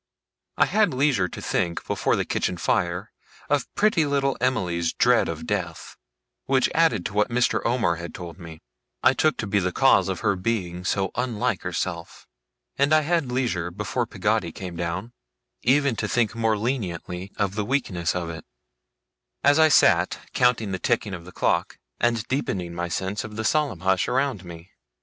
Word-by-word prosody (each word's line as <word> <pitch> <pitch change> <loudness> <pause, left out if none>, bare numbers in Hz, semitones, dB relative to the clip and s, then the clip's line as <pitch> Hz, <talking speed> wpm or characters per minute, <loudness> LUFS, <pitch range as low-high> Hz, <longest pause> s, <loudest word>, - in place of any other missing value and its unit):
I - - +5
had 210 -10 +2
leisure 130 -9 +2
to - - -8
think, 85 -1 -1
before - - +1
the - - -1
kitchen 90 - -1
fire, 90 +4 -1 0.4
of 145 -3 +1
pretty 210 -6 +3
little 140 -2 +1
Emily's 90 -10 0
dread - - +3
of - - -5
death - - -4 0.5
which, 135 -1 +2
added 155 - +2
to - - -3
what 105 0 +2
Mr. 120 +1 +1
Omer 115 -9 +1
had 85 +1 -7
told 85 0 -8
me, 80 -2 -11 0.4
I - - +6
took 155 +3 +2
to - - -3
be 100 0 +1
the 90 -1 -1
cause 100 -5 +4
of 95 - -3
her 100 - +2
being 90 -3 -2
so 95 0 0
unlike 125 -3 -1
herself 85 -2 -4 0.5
and 140 +2 +3
I 155 - +5
had 155 -4 0
leisure, 120 -10 -1
before 105 +6 -3
Peggotty 105 -3 0
came 90 0 -7
down, 85 +7 -4 0.5
even 140 0 +3
to 105 - -1
think 115 -1 +1
more 115 -2 +1
leniently 95 -5 -3
of 100 -2 0
the 105 0 -1
weakness 95 -9 -1
of 90 -2 -2
it: 80 -2 -8 1.0
as 145 +2 +5
I 160 - +7
sat - - +4 0.2
counting 120 -5 +2
the 95 - -2
ticking 100 +2 0
of 85 -2 -7
the 90 - -11
clock, - - 0 0.2
and 115 -1 +1
deepening 95 -10 -2
my 85 0 -3
sense 95 +4 -3
of 110 -1 -8
the 110 - -3
solemn 140 - 0
hush 95 -1 +2
around 130 -7 0
me. 85 +1 -11
105 Hz, 175 wpm, -24 LUFS, 90-130 Hz, 1.0 s, I